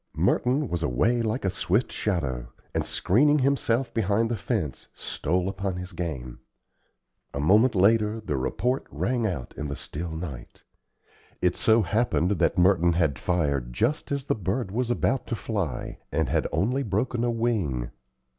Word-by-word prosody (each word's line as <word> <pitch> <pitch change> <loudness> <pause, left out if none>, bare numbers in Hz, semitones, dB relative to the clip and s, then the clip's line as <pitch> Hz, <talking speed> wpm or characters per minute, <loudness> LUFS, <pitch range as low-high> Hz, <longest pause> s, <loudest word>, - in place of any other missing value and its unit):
Merton 130 +4 +2
was 85 -5 -2
away 115 - +2
like 110 +1 -1
a 95 - +2
swift 95 +5 0
shadow, 65 - -2 0.2
and, - - 0
screening 145 +10 +3
himself 130 -2 +1
behind 110 +1 +1
the - - +1
fence, 105 - -3
stole 90 +4 -1
upon 95 -1 -2
his 90 +1 -6
game. 75 -9 -5 1.0
A - - -2
moment 105 - +4
later 105 +3 +3
the 105 -9 -3
report 120 - -1
rang 120 -2 0
out 80 - -4
in 75 - -4
the 70 - -4
still 85 +5 -6
night. 80 -6 -7 0.8
It - - +2
so 110 0 +4
happened 105 -5 +1
that - - +2
Merton 90 -1 +4
had 80 -6 +1
fired 70 -9 0
just 125 - 0
as 140 -2 -1
the - - +1
bird 100 +1 -2
was 120 +3 -1
about 125 +2 0
to 115 - -1
fly, 95 - -3
and 80 -2 0
had - - +1
only 110 - +1
broken 115 +2 -1
a 120 - +2
wing. 105 - -1
100 Hz, 160 wpm, -26 LUFS, 80-115 Hz, 1.0 s, moment